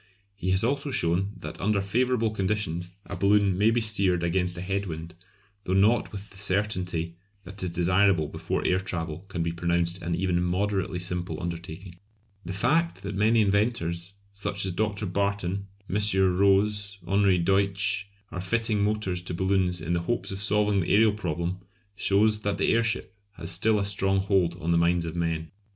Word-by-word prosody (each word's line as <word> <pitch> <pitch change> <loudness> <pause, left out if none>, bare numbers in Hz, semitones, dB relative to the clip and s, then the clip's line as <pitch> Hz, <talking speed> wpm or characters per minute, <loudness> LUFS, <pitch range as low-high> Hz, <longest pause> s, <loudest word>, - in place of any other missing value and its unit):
He 95 -2 -3
has 95 +2 +3
also 140 +4 0
shown 95 -3 +1
that - - -7
under 105 +1 +2
favourable 115 +3 +1
conditions 95 -4 -2
a 100 - -6
balloon 100 0 +3
may 105 +4 +4
be 115 +1 +2
steered 100 -5 +2
against 90 +1 0
a - - -5
head 100 +2 -2
wind, 80 0 -6 0.5
though 95 - -1
not 105 +5 +3
with 100 0 -9
the 100 - -12
certainty 90 -4 -1 0.3
that 95 +2 -8
is 90 - 0
desirable 90 -1 +3
before - - -3
air 90 - +3
travel 85 -2 -4
can 90 -4 -3
be 85 - -1
pronounced 85 +1 -1
an 85 0 -1
even 90 -1 0
moderately 95 +1 0
simple 90 0 -3
undertaking. 85 +1 -7 0.4
The 90 - -6
fact 160 - +1
that 100 +1 -4
many 110 +3 +3
inventors, 100 -4 0 0.2
such 100 0 -1
as 95 - -1
Dr. 105 +2 -1
Barton, 100 0 -1 0.2
M. 95 - -1 0.4
Roze, 100 +1 +2
Henri 100 -1 +3
Deutsch, 100 +3 +1 0.2
are 90 +2 -4
fitting 110 +1 0
motors 105 -4 0
to 90 -1 -5
balloons 95 -2 +1
in 85 +2 -2
the 85 - +1
hopes 120 - -1
of 95 0 -5
solving 105 0 +2
the 85 - -1
aërial 105 +1 +4
problem 85 -2 -3 0.4
shows 105 +2 +2
that 100 -2 -2
the - - +2
airship 115 -3 0 0.2
has 85 -1 -5
still 105 +5 +2
a 100 - 0
strong 95 -1 +1
hold 95 -3 +1
on 85 -1 -1
the 85 - +4
minds 85 0 +2
of 80 0 -5
men. 80 -2 -2
95 Hz, 175 wpm, -27 LUFS, 85-105 Hz, 0.5 s, may